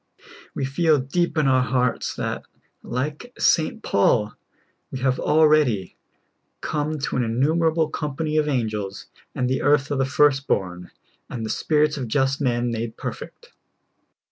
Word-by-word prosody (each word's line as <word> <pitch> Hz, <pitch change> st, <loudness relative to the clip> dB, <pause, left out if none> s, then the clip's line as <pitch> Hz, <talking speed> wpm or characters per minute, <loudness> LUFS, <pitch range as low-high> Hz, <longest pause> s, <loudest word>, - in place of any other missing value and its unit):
We 135 Hz, -, -1 dB
feel 155 Hz, +3 st, +2 dB
deep 165 Hz, +7 st, -1 dB
in 155 Hz, -, +3 dB
our 130 Hz, -1 st, +4 dB
hearts 125 Hz, -1 st, 0 dB
that, -, -, -4 dB, 0.4 s
like 150 Hz, -, -4 dB
St. 170 Hz, +7 st, +2 dB
Paul, 105 Hz, +1 st, +2 dB, 0.6 s
we -, -, -5 dB
have 130 Hz, -1 st, +1 dB
already 150 Hz, -11 st, +3 dB, 0.3 s
" -, -, -48 dB, 0.3 s
come 155 Hz, +1 st, -2 dB
to 140 Hz, -, -2 dB
an 125 Hz, -, +1 dB
innumerable 160 Hz, +7 st, +1 dB
company 150 Hz, 0 st, -3 dB
of 150 Hz, -1 st, +2 dB
angels, 110 Hz, -7 st, -2 dB, 0.3 s
and 125 Hz, -, 0 dB
the 130 Hz, +1 st, 0 dB
Church 145 Hz, -1 st, +2 dB
of 140 Hz, -, 0 dB
the 135 Hz, -, +2 dB
first 140 Hz, -1 st, +2 dB
born, 90 Hz, -2 st, -2 dB, 0.4 s
and 115 Hz, -2 st, -5 dB
the 110 Hz, -, -3 dB
spirits 150 Hz, -1 st, +1 dB
of 130 Hz, -3 st, -4 dB
just 135 Hz, +4 st, 0 dB
men 120 Hz, -2 st, 0 dB
made 115 Hz, 0 st, -4 dB
perfect." -, -, -8 dB
135 Hz, 150 wpm, -23 LUFS, 120-150 Hz, 0.6 s, our